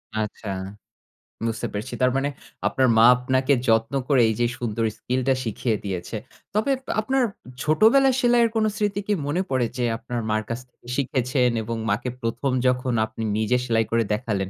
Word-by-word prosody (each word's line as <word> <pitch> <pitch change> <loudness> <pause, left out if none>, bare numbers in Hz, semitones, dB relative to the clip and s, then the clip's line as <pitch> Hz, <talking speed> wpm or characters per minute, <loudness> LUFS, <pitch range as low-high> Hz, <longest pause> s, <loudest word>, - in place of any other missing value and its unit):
আচ্ছা, 110 0 -4 1.0
বুঝতে 115 -1 -2
পেরেছি। 105 +5 -4
তার 125 0 +4
মানে 140 +1 0 0.4
আপনার 130 -1 +2
মা 115 - +7
আপনাকে 130 +2 +1
যত্ন 115 +2 +2
করে 135 -4 +4
এই 110 - +1
যে 120 - +3
সুন্দর 115 -1 -2
skill 125 +4 -1
টা 135 - +5
শিখিয়ে 115 0 -1
দিয়েছে। 95 +2 -4 0.4
তবে 215 +7 +1 0.3
আপনার 265 +4 +1 0.4
ছোটবেলার 225 - +5
সেলাইয়ের 240 -2 +4
কোন 220 -1 +2
স্মৃতি 205 -2 0
কি 210 - +2
মনে 160 +6 0
পড়ে 130 -3 +1
যে 125 - 0
আপনার 120 +1 -4
মার 110 0 +1
কাছ 115 +1 -2
থেকে 120 - -23
শিখেছেন 130 -1 +1
এবং 115 +2 -3
মাকে 115 +5 0
১ম, 120 +3 -1 0.2
যখন 125 0 +1
আপনি 110 +1 -7
নিজে 110 +3 +2
সেলাই 115 -2 +2
করে 115 0 +3
দেখালেন 105 -4 -2
125 Hz, 170 wpm, -24 LUFS, 115-140 Hz, 1.0 s, মা